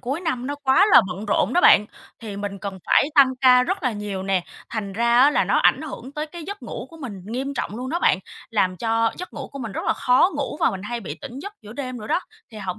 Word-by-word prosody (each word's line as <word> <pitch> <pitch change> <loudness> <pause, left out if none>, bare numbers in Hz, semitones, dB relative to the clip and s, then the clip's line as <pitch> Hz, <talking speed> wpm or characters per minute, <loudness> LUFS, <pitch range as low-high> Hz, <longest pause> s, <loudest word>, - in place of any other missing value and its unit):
cuối 270 +6 -3
năm 260 -8 -2
nó 285 - -2
quá 280 +10 +5
là - - +10
bận 190 +4 -6
rộn 205 +2 +1
đó 355 - +4
bạn. 210 - +6 0.3
Thì 210 -3 -7
mình 200 -1 -5
cần 195 -1 -6
phải 280 - +4
tăng 275 -3 +6
ca 250 -1 +6
rất 375 +8 -2
là 255 -3 +1
nhiều 205 -2 -5
nè, 190 -2 0 0.3
thành 210 -4 -4
ra 235 +3 +2
á 290 - +6
là - - +2
nó - - +2
ảnh - - +3
hưởng 275 -3 -8
tới 300 +1 -4
cái 340 +2 -9
giấc 405 +4 -7
ngủ - - -6
của 330 - -13
mình 240 -11 -7
nghiêm 265 +5 -4
trọng 215 - -4
luôn 255 +2 -5
đó 340 - 0
bạn, 190 - +3 0.3
làm 185 -5 +1
cho 225 +3 +1
giấc 360 - -7
ngủ - - -7
của 275 - -7
mình 230 -6 -5
rất - - -4
là - - +3
khó 255 +9 +3
ngủ 285 0 -3
và - - +4
mình 190 -1 -6
hay 235 +3 -4
bị 160 -6 -7
tỉnh 250 - -8
giấc 400 +8 -7
giữa 210 0 -10
đêm 255 -1 -5
nữa 215 - -8
đó. - - +1 0.3
Thì 220 - -10
hổng 185 -3 -5
240 Hz, 275 wpm, -23 LUFS, 205-280 Hz, 0.3 s, là